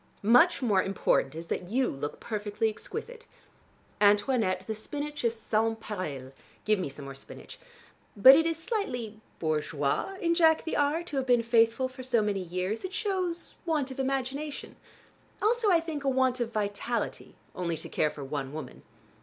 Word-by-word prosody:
Much 245 Hz, -, +5 dB
more 205 Hz, -6 st, +3 dB
important 185 Hz, -7 st, +1 dB
is 165 Hz, +1 st, -6 dB
that 175 Hz, +1 st, -3 dB
you 255 Hz, +6 st, +1 dB
look 145 Hz, +2 st, -5 dB
perfectly 210 Hz, 0 st, -2 dB
exquisite. 470 Hz, -, -8 dB, 0.7 s
Antoinette, 205 Hz, -2 st, +3 dB
the 220 Hz, -, -3 dB
spinach 290 Hz, +7 st, -5 dB
is 230 Hz, -1 st, +1 dB
sans 225 Hz, +1 st, 0 dB
pareil: 155 Hz, -12 st, -5 dB, 0.3 s
give 215 Hz, -2 st, +3 dB
me 180 Hz, -, -2 dB
some 140 Hz, +1 st, -9 dB
more 135 Hz, -, -7 dB
spinach. 135 Hz, -, -11 dB, 0.6 s
But 260 Hz, +7 st, +10 dB
it 325 Hz, +2 st, +3 dB
is 330 Hz, -1 st, -1 dB
slightly 245 Hz, -, -3 dB, 0.2 s
bourgeois 155 Hz, -, -1 dB
in 335 Hz, -1 st, +2 dB
Jack 325 Hz, -2 st, +4 dB
the 320 Hz, -, -3 dB
R. 295 Hz, +4 st, +1 dB
to 300 Hz, -5 st, -5 dB
have 265 Hz, -1 st, -1 dB
been 245 Hz, -2 st, +4 dB
faithful 230 Hz, +2 st, +3 dB
for 255 Hz, 0 st, -10 dB
so 245 Hz, -4 st, +1 dB
many 200 Hz, -2 st, -1 dB
years. 185 Hz, +4 st, -3 dB
It 375 Hz, 0 st, -5 dB
shows 370 Hz, -5 st, -2 dB
want 300 Hz, -5 st, 0 dB
of 265 Hz, -, -8 dB
imagination, 270 Hz, +2 st, -3 dB, 0.6 s
also 450 Hz, 0 st, +2 dB
I 345 Hz, -3 st, +5 dB
think 320 Hz, -3 st, -5 dB
a 275 Hz, -, +2 dB
want 260 Hz, -1 st, +2 dB
of 235 Hz, -1 st, -2 dB
vitality, 215 Hz, +2 st, -3 dB, 0.2 s
only 170 Hz, -3 st, -2 dB
to 160 Hz, -, -6 dB
care 155 Hz, -, +1 dB
for 145 Hz, -, -8 dB
one 135 Hz, 0 st, -4 dB
woman." 155 Hz, -, -7 dB
230 Hz, 170 wpm, -29 LUFS, 190-290 Hz, 0.7 s, But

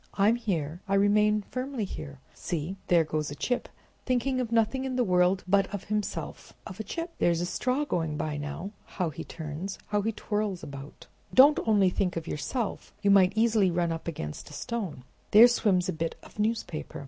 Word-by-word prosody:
I'm 205 Hz, +3 st, +4 dB
here, 175 Hz, -8 st, -2 dB
I 195 Hz, -, +1 dB
remain 210 Hz, +1 st, +3 dB
firmly 255 Hz, -3 st, -3 dB
here. 140 Hz, -6 st, -7 dB, 0.2 s
See, 170 Hz, +2 st, -4 dB
there 170 Hz, -2 st, +5 dB
goes 155 Hz, -1 st, -2 dB
a 145 Hz, -, -6 dB
chip 245 Hz, +10 st, -2 dB, 0.3 s
thinking 255 Hz, +1 st, 0 dB
of 235 Hz, -2 st, -4 dB
nothing 230 Hz, +3 st, +2 dB
in 260 Hz, -1 st, -3 dB
the 250 Hz, -, +2 dB
world 180 Hz, -1 st, +3 dB
but 195 Hz, 0 st, +3 dB
of 200 Hz, -2 st, -4 dB
himself—of 210 Hz, -1 st, -5 dB
a -, -, -2 dB
chip! 330 Hz, -, -5 dB
There's 170 Hz, -1 st, +3 dB
a 175 Hz, -, -1 dB
straw 255 Hz, +10 st, 0 dB
going 160 Hz, -, -1 dB
by 150 Hz, 0 st, -2 dB
now. 145 Hz, +7 st, -5 dB, 0.3 s
How 180 Hz, -5 st, 0 dB
he 140 Hz, -, -7 dB
turns! 160 Hz, +4 st, -6 dB
how 205 Hz, 0 st, +1 dB
he 220 Hz, +3 st, 0 dB
twirls 210 Hz, -3 st, -2 dB
about! 140 Hz, 0 st, -9 dB, 0.3 s
Don't 285 Hz, +3 st, +8 dB
think -, -, -3 dB
only 200 Hz, -4 st, +4 dB, 0.2 s
of 165 Hz, 0 st, -4 dB
yourself, 220 Hz, -, -3 dB
you 200 Hz, -, +4 dB
might 190 Hz, -1 st, +6 dB
easily 220 Hz, -3 st, +3 dB
run 170 Hz, -1 st, 0 dB
up 165 Hz, 0 st, -5 dB
against 75 Hz, -, -5 dB
a -, -, -12 dB
stone. 195 Hz, -, -4 dB, 0.3 s
There 220 Hz, +3 st, +9 dB
swims 205 Hz, -7 st, +2 dB
a -, -, -1 dB
bit 165 Hz, +1 st, -3 dB
of -, -, -15 dB
newspaper. 215 Hz, -7 st, -2 dB
195 Hz, 190 wpm, -28 LUFS, 165-225 Hz, 0.3 s, There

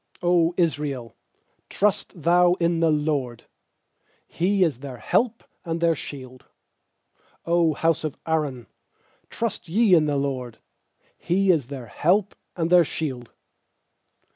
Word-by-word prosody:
90 175 Hz, -1 st, +3 dB
Israel, 145 Hz, -, -1 dB, 0.5 s
trust 200 Hz, -4 st, -1 dB
thou 175 Hz, +1 st, +4 dB
in 170 Hz, -1 st, 0 dB
the 165 Hz, -1 st, +3 dB
LORD! 150 Hz, -6 st, -1 dB, 0.8 s
He 190 Hz, +2 st, +1 dB
is 155 Hz, -8 st, 0 dB
their 135 Hz, -2 st, -8 dB
help 230 Hz, -, 0 dB, 0.2 s
and 165 Hz, -1 st, -3 dB
their 170 Hz, 0 st, +3 dB
shield! 130 Hz, -4 st, -9 dB, 1.0 s
100 170 Hz, -2 st, +2 dB
house 165 Hz, -1 st, +2 dB
of 155 Hz, -3 st, -4 dB
Aaron, 150 Hz, -7 st, -2 dB, 0.6 s
trust 220 Hz, -6 st, -4 dB
ye 210 Hz, +2 st, +3 dB
in 160 Hz, -3 st, +5 dB
the 145 Hz, -1 st, 0 dB
LORD! 130 Hz, -4 st, -3 dB, 0.6 s
He 190 Hz, +2 st, +2 dB
is 150 Hz, -8 st, 0 dB
their 135 Hz, -3 st, -7 dB
help 185 Hz, -, +1 dB, 0.2 s
and 165 Hz, -1 st, -2 dB
their 180 Hz, -1 st, +7 dB
shield! 130 Hz, -6 st, -5 dB
165 Hz, 125 wpm, -24 LUFS, 140-175 Hz, 1.0 s, their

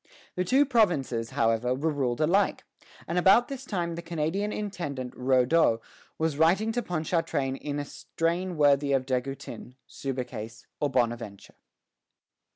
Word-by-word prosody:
The 180 Hz, -, 0 dB
two 265 Hz, +10 st, +4 dB
provinces, 160 Hz, -, +1 dB
however, 115 Hz, +2 st, +1 dB
were 155 Hz, +4 st, 0 dB
ruled 130 Hz, -3 st, -1 dB
alike; 190 Hz, +6 st, +2 dB, 0.4 s
and 175 Hz, +1 st, 0 dB
about 195 Hz, +8 st, +5 dB
this 270 Hz, -1 st, -6 dB
time 175 Hz, -7 st, -2 dB
the 170 Hz, -, -5 dB
Canadian 170 Hz, +5 st, -2 dB
Intendant 170 Hz, -13 st, -4 dB
Raudot 130 Hz, 0 st, +3 dB, 0.4 s
was 160 Hz, -2 st, -1 dB
writing 190 Hz, +8 st, +3 dB
to 245 Hz, +2 st, -1 dB
Ponchartrain 160 Hz, -, -1 dB
in 145 Hz, +1 st, -4 dB
a 145 Hz, -, -3 dB
strain 170 Hz, +4 st, -2 dB
worthy 145 Hz, -1 st, +4 dB
of 130 Hz, -1 st, +1 dB
De 130 Hz, -1 st, +1 dB
Goutin, 135 Hz, -1 st, -8 dB
Subercase, 120 Hz, -5 st, -6 dB
or 145 Hz, -, +1 dB
Bonaventure. 115 Hz, -5 st, -2 dB
150 Hz, 140 wpm, -27 LUFS, 130-180 Hz, 0.4 s, about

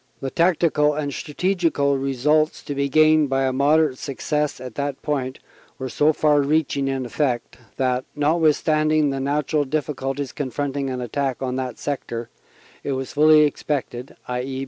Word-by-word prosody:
The 135 Hz, -1 st, -4 dB
tactical 160 Hz, -4 st, +2 dB
and 145 Hz, -2 st, -3 dB
strategical 165 Hz, -4 st, 0 dB
results 140 Hz, +4 st, +1 dB
to 145 Hz, -, -4 dB
be 140 Hz, 0 st, -1 dB
gained 155 Hz, 0 st, +4 dB
by 135 Hz, 0 st, +1 dB
a 130 Hz, -1 st, 0 dB
moderate 145 Hz, 0 st, +2 dB
success 150 Hz, +1 st, -2 dB
at 125 Hz, -2 st, -8 dB
that 140 Hz, 0 st, -3 dB
point 135 Hz, -3 st, -2 dB, 0.4 s
were 130 Hz, 0 st, -5 dB
so 150 Hz, +5 st, +3 dB
far 150 Hz, -1 st, +3 dB
reaching 140 Hz, -1 st, 0 dB
in 135 Hz, -1 st, -2 dB
effect 125 Hz, -1 st, -2 dB, 0.2 s
that, 130 Hz, -1 st, 0 dB
notwithstanding 155 Hz, -1 st, +2 dB
the 135 Hz, -, -3 dB
natural 145 Hz, +2 st, 0 dB
difficulties 140 Hz, -1 st, -3 dB
confronting 140 Hz, 0 st, -3 dB
an 130 Hz, -1 st, -3 dB
attack 135 Hz, +2 st, -2 dB
on 130 Hz, -1 st, -2 dB
that 130 Hz, -3 st, -4 dB
sector, 120 Hz, -5 st, -4 dB, 0.5 s
it 140 Hz, -, -2 dB
was 130 Hz, 0 st, -4 dB
fully 155 Hz, +1 st, +6 dB
expected 140 Hz, -3 st, -2 dB
(i.e. 125 Hz, +2 st, -3 dB
140 Hz, 150 wpm, -22 LUFS, 130-150 Hz, 0.5 s, fully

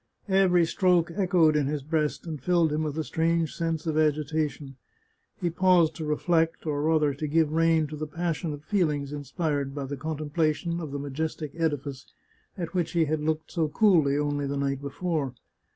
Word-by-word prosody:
Every 185 Hz, -3 st, +4 dB
stroke 175 Hz, -1 st, +2 dB
echoed 175 Hz, -5 st, +3 dB
in 145 Hz, -2 st, +2 dB
his 145 Hz, -1 st, -2 dB
breast, 155 Hz, +1 st, -1 dB
and 155 Hz, -5 st, -5 dB
filled 170 Hz, 0 st, +2 dB
him 155 Hz, -, 0 dB
with 155 Hz, -1 st, -3 dB
a 160 Hz, -, 0 dB
strange 165 Hz, +3 st, 0 dB
sense 165 Hz, -1 st, -2 dB
of 155 Hz, -1 st, 0 dB
agitation. 150 Hz, -2 st, -1 dB, 0.6 s
He 175 Hz, -2 st, -1 dB
paused 180 Hz, -2 st, +3 dB
to 160 Hz, -, -4 dB
reflect, 165 Hz, +2 st, +1 dB
or 145 Hz, -2 st, -1 dB
rather 155 Hz, -2 st, +2 dB
to 150 Hz, +3 st, -4 dB
give 155 Hz, 0 st, +2 dB
rein 165 Hz, -1 st, +3 dB
to 150 Hz, +1 st, -7 dB
the 155 Hz, +1 st, -4 dB
passionate 160 Hz, -2 st, -3 dB
feelings 150 Hz, -8 st, 0 dB
inspired 145 Hz, -1 st, -2 dB
by 140 Hz, -2 st, -3 dB
the 140 Hz, +1 st, -5 dB
contemplation 155 Hz, +3 st, -1 dB
of 155 Hz, -4 st, -6 dB
the 140 Hz, -, -3 dB
majestic 145 Hz, +2 st, -4 dB
edifice 145 Hz, -5 st, -2 dB, 0.5 s
at 170 Hz, -1 st, -4 dB
which 175 Hz, -3 st, -1 dB
he 165 Hz, -2 st, +3 dB
had 155 Hz, 0 st, -1 dB
looked 155 Hz, +1 st, -2 dB
so 165 Hz, -3 st, 0 dB
coolly 155 Hz, -6 st, +3 dB
only 145 Hz, -1 st, -1 dB
the 140 Hz, +1 st, -2 dB
night 140 Hz, -1 st, -1 dB
before. 145 Hz, -2 st, -2 dB
155 Hz, 180 wpm, -27 LUFS, 145-165 Hz, 0.6 s, Every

